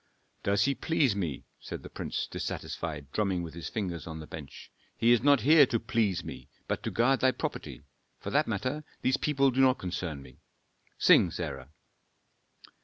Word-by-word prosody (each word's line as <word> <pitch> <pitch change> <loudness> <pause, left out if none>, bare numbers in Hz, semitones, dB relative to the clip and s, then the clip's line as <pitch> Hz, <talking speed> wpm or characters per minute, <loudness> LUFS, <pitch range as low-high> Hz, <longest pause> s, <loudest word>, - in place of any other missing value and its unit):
"Does 100 +1 +2
he 140 - +2
please 140 -6 +1
me," 85 -9 -3
said - - -7
the - - -9
prince, - - -3
dissatisfied, 75 -4 -5
drumming 95 -3 0
with 80 - -7
his 85 0 -6
fingers 90 -7 -4
on 80 -1 -6
the 80 - -7
bench. 75 -3 -10 0.3
"He 115 +1 +4
is 120 - +5
not 140 +1 +5
here 150 0 +7
to 115 - 0
please 115 -5 0
me, - - -9 0.2
but - - -2
to - - -3
guard 130 +3 +2
thy 130 - +4
property. 130 - -5 0.4
For - - -6
that 145 +3 +2
matter, 130 +8 -2 0.2
these 130 +1 +3
people 140 -3 +2
do 130 +2 +2
not 130 -1 +5
concern 90 -5 -4
me. 65 -2 -16 0.6
Sing, - - +6
Sarah." 65 +1 -5
105 Hz, 180 wpm, -29 LUFS, 85-130 Hz, 0.6 s, here